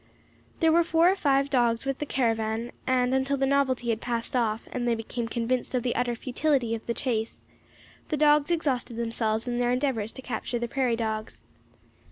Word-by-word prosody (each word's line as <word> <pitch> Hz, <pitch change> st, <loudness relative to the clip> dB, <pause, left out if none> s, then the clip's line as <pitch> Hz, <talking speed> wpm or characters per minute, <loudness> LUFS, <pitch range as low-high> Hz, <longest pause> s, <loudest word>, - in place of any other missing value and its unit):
There 325 Hz, -1 st, +5 dB
were 340 Hz, +1 st, +5 dB
four 335 Hz, +2 st, +4 dB
or -, -, 0 dB
five 275 Hz, -5 st, +1 dB
dogs 240 Hz, -2 st, +2 dB
with 270 Hz, -1 st, -2 dB
the 295 Hz, -, -3 dB
caravan, 225 Hz, -2 st, 0 dB, 0.2 s
and 255 Hz, 0 st, +2 dB
until 265 Hz, +1 st, +1 dB
the 270 Hz, -, +1 dB
novelty 265 Hz, -3 st, +1 dB
had 220 Hz, -, -2 dB
passed 235 Hz, 0 st, -3 dB
off, 225 Hz, -2 st, 0 dB
and 245 Hz, -1 st, -2 dB
they 235 Hz, -, +2 dB
became 230 Hz, +1 st, -4 dB
convinced 240 Hz, +2 st, -1 dB
of 245 Hz, -, 0 dB
the 245 Hz, -, -1 dB
utter 245 Hz, -1 st, 0 dB
futility 255 Hz, -1 st, 0 dB
of 225 Hz, -, -4 dB
the 235 Hz, -, -1 dB
chase, 225 Hz, -4 st, -2 dB, 0.7 s
the 305 Hz, -, 0 dB
dogs 295 Hz, 0 st, +4 dB
exhausted 270 Hz, -8 st, -1 dB
themselves 230 Hz, 0 st, -1 dB
in 240 Hz, 0 st, -1 dB
their 245 Hz, 0 st, +2 dB
endeavours 250 Hz, -5 st, 0 dB
to 260 Hz, -, -10 dB
capture 240 Hz, 0 st, -3 dB
the 240 Hz, 0 st, -2 dB
prairie 250 Hz, -1 st, 0 dB
dogs. 220 Hz, -1 st, -4 dB
245 Hz, 195 wpm, -27 LUFS, 230-275 Hz, 0.7 s, There